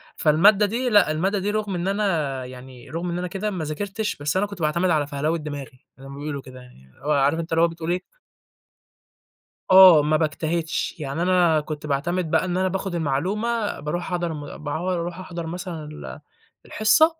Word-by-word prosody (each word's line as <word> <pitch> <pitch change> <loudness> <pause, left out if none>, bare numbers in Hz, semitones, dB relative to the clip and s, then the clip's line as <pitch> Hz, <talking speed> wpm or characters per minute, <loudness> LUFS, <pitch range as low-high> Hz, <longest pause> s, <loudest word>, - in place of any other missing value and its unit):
فالمادة 195 +7 +5
دي 245 +5 -1
لأ 205 -8 +5
المادة 190 +6 0
دي 205 +2 -1
رُغم 210 -3 -2
إن 175 +2 -2
أنا 160 -11 0
يعني 125 -1 -11
رُغم 170 +2 -3
إن 170 - -2
أنا 180 - -2
كده 200 +4 -3
ما 180 -4 -3
ذاكرتش، 200 +7 -3
بس 145 +5 -2
أنا 205 - +2
كنت 200 -4 -9
باعتمد 170 +4 +1
على 150 -3 +2
فَهلوة 150 +4 -1
دماغي، 145 -4 -8
زي 135 - -11
ما 140 - -9
بيقولوا 145 -1 -4
كده 130 -1 -12
يعني، 125 - -17
اللي 130 - -20
هو 150 - +1
عارف 145 +2 +3
أنت 165 0 -5
اللي 165 - +3
هو 170 - +6
بتقول 165 0 -4
إيه 180 +1 0 1.7
آه 185 -5 +9
ما 155 +1 +2
باجتهدش، 160 +1 -1
يعني 145 +2 -3
أنا 175 -3 +3
كنت 150 0 -6
باعتمد 160 +4 -1
بقى - - +3
إن 180 0 -1
أنا 185 0 +2
باخد 190 -1 -3
المعلومة، 205 +10 -1
بارُوح 150 +4 -3
أحضَر 175 -2 -1
م 145 -2 -7
باعوض، 165 +5 -2
أرُوح 175 +1 -3
أحضر 175 -2 -6
مثلًا 175 -1 -5
ال 150 +1 -9 0.5
الحصة 220 +9 +4
165 Hz, 195 wpm, -23 LUFS, 150-185 Hz, 1.7 s, آه